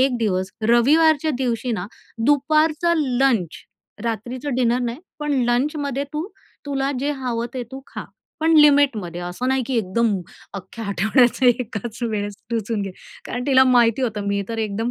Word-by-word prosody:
1 260 -1 +3
दिवस 190 -4 -1 0.2
रविवारच्या 305 +6 +4
दिवशी 245 -1 -1
ना, 190 -4 -3 0.4
दुपारचा 310 +3 +3
लंच 255 - +1 0.5
,रात्रीच 240 +4 -4
डिनर 245 -1 +2
नाही, 240 0 -3 0.2
पण 295 -1 -2 0.2
लंचमध्ये 280 +2 0
तू 305 +3 -3 0.4
तुला 275 -1 -1
जे 285 +2 0
हवं 245 -4 -3
ते 255 - -3
तू 265 - -6
खा, - - -7 0.4
पण 320 +1 +3
लिमिटमध्ये. 280 - +4
असं 180 +8 -3
नाही 265 0 +1
की 265 - -1
एकदम 220 +3 +1 0.4
अख्ख्या 195 +4 -7
आठवड्याचा 230 +6 +2
एकाच 235 -2 0
वेळेस 205 -3 -2
टुसून 225 -2 -1
घे. 195 - -4 0.4
कारण 245 +1 -4
तिला 265 -2 +6
माहिती 245 -1 +3
होतं, 210 -4 -2
मी 200 0 0
तर 230 -1 -4
एकदम 220 +2 -2
245 Hz, 155 wpm, -21 LUFS, 220-275 Hz, 0.5 s, तिला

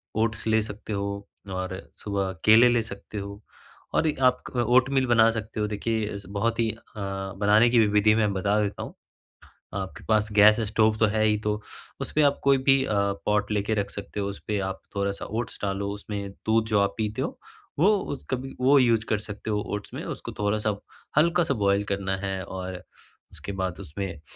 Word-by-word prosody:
Oats 110 0 0
ले 110 0 +3
सकते 105 0 -6
हो, 100 0 -3 0.2
और 95 0 -4 0.2
सुबह 100 -2 -1
केले 115 +3 +8
ले 120 -1 +3
सकते 105 0 -9
हो 100 +1 -7 0.5
और 160 - +3
एक 150 - -1
आप 125 - -7
ओटमील 130 +2 +3
बना 115 -1 +5
सकते 110 -1 -5
हो। 105 - +1
देखिए 110 +1 -1
अस 100 -1 -7
बहुत 115 +2 0
ही 115 - +2
अ, 110 - -13 0.2
बनाने 100 +3 +2
की 120 0 +4
विधि 105 +1 +4
मैं 105 -2 +2
बता 100 +2 +1
देता 100 -1 -2
हूँ। - - -9 0.8
आपके 95 -1 -5
पास 110 -1 +3
गैस 105 +2 +6
स्टोव 110 0 +3
तो 110 - +5
है 110 0 +1
ही 105 -1 +3
तो 105 - +3 0.5
उसपे 155 - 0
आप 140 -1 +3
कोई 140 -1 +5
भी 135 0 +4
अ, 105 - -1 0.3
पॉट 105 0 +1
लेके 105 +1 0
रख 100 -1 -1
सकते 100 0 -6
हो, 100 - -1
उसपे 100 +1 -3
आप 95 - -7 0.2
थोड़ा-सा 100 0 -1
ओट्स 115 +2 -4
डालो 100 0 -1
उसमें 100 -1 -5 0.2
दूध 110 0 +3
जो 105 -2 +3
आप 100 0 +1
पीते 110 0 -1
हो, - - -4 0.4
वो 175 +7 +5 0.2
उस 140 - -7
कभी 135 +1 -3
वो 140 +3 +6
यूज़ 115 -4 +3
कर 110 - +2
सकते 105 +1 -7
हो 105 -1 +1
ओट्स 105 - -6
में - - -4
उसको - - -6
थोड़ा-सा 105 0 0 0.4
हल्का-सा 170 -1 +3
बॉयल 100 -2 +2
करना 100 -1 -1
है। 95 -1 -3
और 95 0 -6 0.5
उसके 100 - -7
बाद 95 -2 -3
उसमें 85 0 -6
105 Hz, 190 wpm, -26 LUFS, 100-115 Hz, 0.8 s, केले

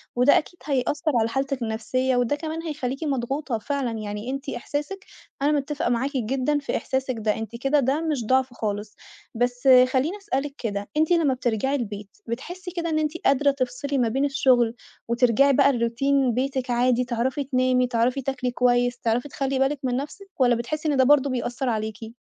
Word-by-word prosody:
وده 250 +3 +5
أكيد 355 +3 -4
هيأثّر 285 +2 0
على 225 0 +1
حالتِك 270 +1 -2
النفسيّة، 250 +4 -1
وده 245 +3 +1
كمان 315 +2 -5
هيخلّيكِ 285 -3 -4
مضغوطة 270 -2 -2
فعلًا، 270 +2 -2
يعني 215 +1 -5
أنتِ 275 +1 -5
إحساسِك 295 +10 -4 0.4
أنا 285 +2 +3
متفقة 290 -2 -1
معاكِ 245 +3 0
جدًا 260 +5 0
في 280 - -2
إحساسِك 265 -1 -2
ده، 215 -1 0
أنتِ 225 0 -6
كده 270 +5 +2
ده 275 +3 +1
مش 300 -8 -1
ضعف 260 +1 +2
خالص، 205 -2 -4 0.4
بس 245 +2 -1 0.3
خلّيني 295 +9 +1
أسألِك 290 -9 -3
كده، 205 -3 -4
أنتِ 315 +2 +2
لمّا 325 -6 +3
بترجعي 250 +2 0
البيت 205 -5 -6
بتحسّي 355 +10 -6
كده 340 -1 -3
إنّ 310 -1 +1
أنتِ 305 -1 0
قادرة 280 +1 +4
تفصلي 275 +1 -2
ما 245 -3 +2
بين 270 +5 +1
الشغل، 250 -4 +3 0.3
وترجعي 245 +3 +4
بقى 280 +1 +4
لروتين 250 +2 +1
بيتِك 260 +1 -2
عادي، 245 +1 +2
تعرفي 250 +4 -1
تنامي، 255 -1 +2
تعرفي 245 +2 +1
تاكلي 260 -1 -2
كويس، 245 0 +2
تعرفي 240 +3 0
تخلّي 270 -1 -2
بالكِ 270 +2 +1
من 250 -2 0
نفسِك، 300 +9 -6
والَّا 245 -2 +4
بتحسّي 305 +7 -3
إنّ 285 - +1
ده 260 - +5
برضه 280 +1 +4
بيأثّر 245 0 -2
عليكِ؟ 220 0 -4
260 Hz, 180 wpm, -24 LUFS, 240-280 Hz, 0.4 s, وده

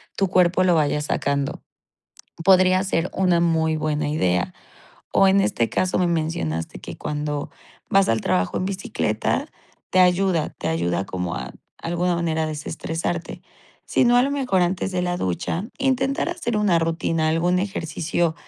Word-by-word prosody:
tu 195 - +1
cuerpo 180 0 +3
lo 180 -2 +4
vaya 150 -1 +1
sacando, 140 -1 -1 0.8
podría 185 0 +5
ser 185 -2 -1
una 180 -2 +2
muy 160 -2 +2
buena 150 -1 -1
idea, 90 - 0 0.6
o 195 - +5
en 195 +1 +4
este 115 -10 0
caso 185 - 0
me 180 - +2
mencionaste 155 - -2
que - - -8
cuando 150 -1 -3 0.4
vas 195 0 +4
al 115 -1 +2
trabajo 90 -2 0
en - - -2
bicicleta 190 -1 -1 0.4
te - - +2
ayuda 180 -2 +3
te - - -3
ayuda 85 +3 0
como 90 -2 -3
a 65 -1 -6 0.3
alguna 175 +1 -1
manera 160 -2 0
desestresarte, 160 +2 -4 0.4
sino 245 -1 +3
a 245 - +6
lo 275 - 0
mejor 255 -10 +1
antes 180 +2 -1
de 180 0 0
la 175 0 -1
ducha 95 - -2
intentar 270 +2 +1
hacer 280 -11 -3
una 200 -5 +3
rutina, 165 -1 0
algún 175 +3 +2
ejercicio, 170 -3 -1
170 Hz, 155 wpm, -23 LUFS, 150-185 Hz, 0.8 s, a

